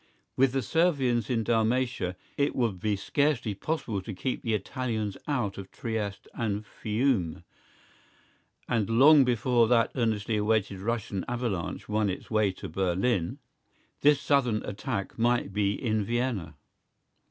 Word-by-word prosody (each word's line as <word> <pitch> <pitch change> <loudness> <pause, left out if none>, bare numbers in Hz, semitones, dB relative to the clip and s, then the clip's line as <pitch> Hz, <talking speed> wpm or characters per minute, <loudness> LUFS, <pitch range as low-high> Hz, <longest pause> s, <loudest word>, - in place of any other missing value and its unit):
With 130 -1 +3
the 135 -1 0
Servians 135 -8 +1
in 115 -3 +1
Dalmatia 115 -4 +1 0.2
it 140 0 0
would 115 -7 0
be 105 +2 0
scarcely 125 +1 0
possible 110 -4 -3
to 100 +1 -7
keep 125 +8 -2
the 115 -2 0
Italians 110 -1 -3
out 120 -10 -1
of 95 - -8
Trieste 105 -3 -4
and 105 -2 -2
Fiume, 105 - -1 1.2
and 110 -3 0
long 140 +5 +7
before 120 -1 +3
that 115 -1 +3
earnestly 110 -3 0
awaited 105 -2 +1
Russian 105 -2 -2
avalanche 120 -8 -3
won 105 -1 +1
its 95 - -6
way 110 -2 +3
to 95 - -8
Berlin, 95 +2 0 0.6
this 145 -1 +5
southern 130 -7 +1
attack 105 0 -4
might 120 -4 +1
be 100 0 +1
in 110 -4 0
Vienna. 115 - -2
110 Hz, 135 wpm, -28 LUFS, 100-125 Hz, 1.2 s, long